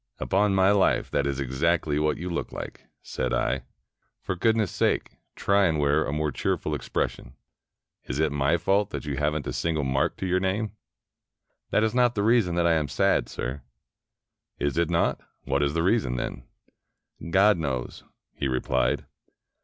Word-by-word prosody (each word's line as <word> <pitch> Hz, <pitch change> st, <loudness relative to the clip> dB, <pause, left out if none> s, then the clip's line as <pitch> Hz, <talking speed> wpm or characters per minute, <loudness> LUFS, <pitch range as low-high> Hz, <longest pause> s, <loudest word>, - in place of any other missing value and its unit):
"Upon 100 Hz, 0 st, +1 dB
my 95 Hz, +1 st, +5 dB
life, 100 Hz, -2 st, +2 dB
that 70 Hz, -, +1 dB
is 70 Hz, -1 st, -2 dB
exactly 75 Hz, +3 st, 0 dB
what 75 Hz, 0 st, +1 dB
you 90 Hz, +4 st, -5 dB
look 85 Hz, -1 st, -3 dB
like," -, -, -8 dB, 0.2 s
said -, -, -2 dB
I. 65 Hz, +1 st, -1 dB, 0.3 s
" -, -, -49 dB
For 95 Hz, -, -2 dB
goodness' 110 Hz, 0 st, +1 dB
sake, -, -, 0 dB, 0.2 s
try 100 Hz, 0 st, +3 dB
and 80 Hz, -2 st, 0 dB
wear 75 Hz, +1 st, +2 dB
a -, -, -3 dB
more 75 Hz, 0 st, -1 dB
cheer -, -, 0 dB
ful -, -, -4 dB
expression. -, -, -3 dB, 0.7 s
Is 60 Hz, -, -4 dB
it 80 Hz, -1 st, +1 dB
my 75 Hz, +4 st, +2 dB
fault 100 Hz, +4 st, +1 dB
that 100 Hz, -, -6 dB
you 70 Hz, -2 st, -3 dB
have 75 Hz, +1 st, +1 dB
n't 80 Hz, -, -3 dB
a -, -, -3 dB
single 80 Hz, -3 st, -1 dB
mark 65 Hz, 0 st, 0 dB
to -, -, -4 dB
your 90 Hz, 0 st, +2 dB
name?" 100 Hz, +3 st, -1 dB, 1.0 s
"That 110 Hz, -, +2 dB
is 110 Hz, 0 st, +1 dB
not 125 Hz, -1 st, +3 dB
the 100 Hz, -, 0 dB
reason 110 Hz, -6 st, +3 dB
that 85 Hz, 0 st, +2 dB
I 85 Hz, -, +4 dB
am 80 Hz, -3 st, +1 dB
sad, -, -, +1 dB
sir." 65 Hz, +4 st, -4 dB, 1.0 s
"Is 70 Hz, -2 st, -1 dB
it 85 Hz, 0 st, +1 dB
not? 85 Hz, -1 st, +1 dB, 0.2 s
What 70 Hz, +2 st, 0 dB
is 70 Hz, +1 st, 0 dB
the 80 Hz, -, +1 dB
reason, 95 Hz, -, +1 dB
then?" 60 Hz, 0 st, -4 dB, 0.4 s
" -, -, -14 dB
God 95 Hz, +2 st, +4 dB
knows," 65 Hz, -6 st, -3 dB, 0.3 s
he 70 Hz, -, -2 dB
replied. 65 Hz, 0 st, 0 dB
80 Hz, 185 wpm, -26 LUFS, 70-95 Hz, 1.0 s, my